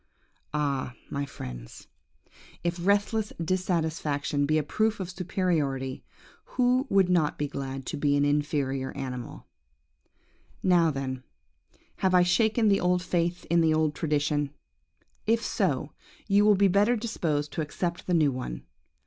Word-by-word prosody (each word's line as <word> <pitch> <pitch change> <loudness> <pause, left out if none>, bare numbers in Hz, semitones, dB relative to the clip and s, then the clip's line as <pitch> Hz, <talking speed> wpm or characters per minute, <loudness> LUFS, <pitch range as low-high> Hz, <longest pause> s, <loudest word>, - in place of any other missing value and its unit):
"Ah, 140 -4 -1 0.2
my 140 0 -2
friends, - - -9 0.8
if 170 0 -2
restless 205 +2 +1
dissatisfaction 160 -5 0
be 155 +1 +2
a 155 - +1
proof 215 +8 0
of 185 -2 -4
superiority, 160 -8 -1 0.5
who 255 +1 +3
would 195 -2 +4
not 170 -5 +2
be 145 - -1
glad 135 -1 -5
to - - -4
be 145 0 +2
an 145 - +3
inferior 145 -2 0
animal? 130 -3 -6 1.2
"Now 175 -3 +4
then, 135 -3 -3 0.8
have 185 -1 +2
I 180 - +6
shaken 220 +5 +3
the 200 -1 +4
old 180 0 +1
faith 175 -1 -1
in 170 0 +3
the 160 -1 +3
old 155 -1 +1
tradition? 145 -2 0 0.8
If 230 +1 +2
so, 155 - 0 0.4
you 205 0 +4
will 210 -1 +6
be 200 +1 +4
better 205 +6 +3
disposed 160 -10 -2
to - - -2
accept 170 +3 -3
the 180 - +2
new 155 -4 +4
one. 125 - -5
160 Hz, 140 wpm, -27 LUFS, 145-185 Hz, 1.2 s, I